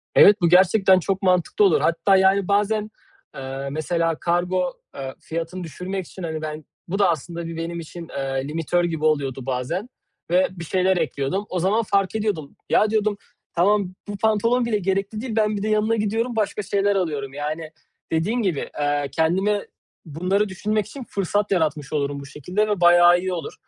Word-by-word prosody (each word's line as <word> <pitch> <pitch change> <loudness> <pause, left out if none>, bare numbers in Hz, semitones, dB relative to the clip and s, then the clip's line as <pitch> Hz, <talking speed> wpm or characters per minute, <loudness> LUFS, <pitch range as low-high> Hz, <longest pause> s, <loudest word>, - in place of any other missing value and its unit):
Evet, 205 0 +7
bu 170 - +4
gerçekten 190 +1 +5
çok 195 +3 -2
mantıklı 185 - +3
olur. 390 - +3
Hatta, 170 +4 +3
yani, 190 0 +3
bazen, 210 +1 +1 0.4
eee, 135 0 -5
mesela 165 +2 0
kargo, 180 +1 0 0.2
eee, 135 -1 -6
fiyatını 170 +2 -5
düşürmek 180 +4 -5
için, 185 - -10
hani, 160 -1 -3
ben 155 -1 -6 0.2
bu 195 +4 -3
da 195 -3 +4
aslında 170 +2 -3
bir 165 - -6
benim 170 +1 -4
için, 165 +1 -9
eee, 135 0 -2
limitör 165 +3 0
gibi 160 -2 -1
oluyordu 135 -4 0
bazen 135 - -3 0.4
ve 180 +2 +4
bir 175 -2 -8
şeyler 185 +2 +2
ekliyordum. 160 +4 -1
O 180 - -2
zaman 205 +6 +2
fark 200 0 0
ediyordum: 205 -10 -2
"Ya," 215 - +4
diyordum 215 -1 +1 0.4
"tamam, 190 +1 +2
bu 205 -1 -5
pantolon 220 +4 +2
bile 220 -3 0
gerekli 195 +3 -1
değil, 240 -4 -4
ben 215 -1 +1
bir 200 - -4
de - - -1
yanına 215 +1 +2
gidiyorum 225 +3 -1
başka 210 -1 -1
şeyler 200 +1 +1
alıyorum." 145 -7 -2
Yani, 155 +2 -4 0.4
dediğin 200 +10 0
gibi, 180 -9 -1
eee, 145 -1 0
kendime 190 +7 +1 0.4
bunları 185 +6 0
düşünmek 210 +3 -1
için 265 +4 -8
fırsat 200 +1 -1
yaratmış 155 -5 0
olurum 140 -1 -1
bu 140 - -9
şekilde 180 +10 -2
ve 205 -3 -1
bayağı 175 0 +7
iyi 185 0 -2
olur. 165 -4 -5
180 Hz, 175 wpm, -23 LUFS, 160-205 Hz, 0.4 s, Evet